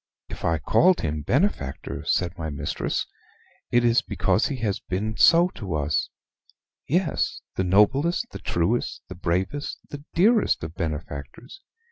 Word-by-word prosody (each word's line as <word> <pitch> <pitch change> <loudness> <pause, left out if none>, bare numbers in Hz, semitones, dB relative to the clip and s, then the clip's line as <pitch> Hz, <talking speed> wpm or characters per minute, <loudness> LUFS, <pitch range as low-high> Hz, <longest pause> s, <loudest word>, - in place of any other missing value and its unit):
"If - - -8
I 80 0 +2
called 180 - +3
him 75 -1 -2
benefactor," 120 - -1
said 90 -1 0
my 80 -3 -4
mistress, 70 - -2 0.6
"it 120 0 +3
is 120 -1 +4
because 110 - +1
he 140 - -3
has 105 -4 0
been 105 +4 -3
so 170 +6 +6
to 95 - -5
us 75 0 0 0.8
yes, 175 +3 0
the 95 - 0
noblest, 130 - +3
the - - -7
truest, 95 +9 -1
the 95 - -7
bravest, 90 +10 -2
the 145 0 -7
dearest 215 - +3
of 80 +1 -5
benefactors. 80 - -6
100 Hz, 140 wpm, -25 LUFS, -, 0.8 s, so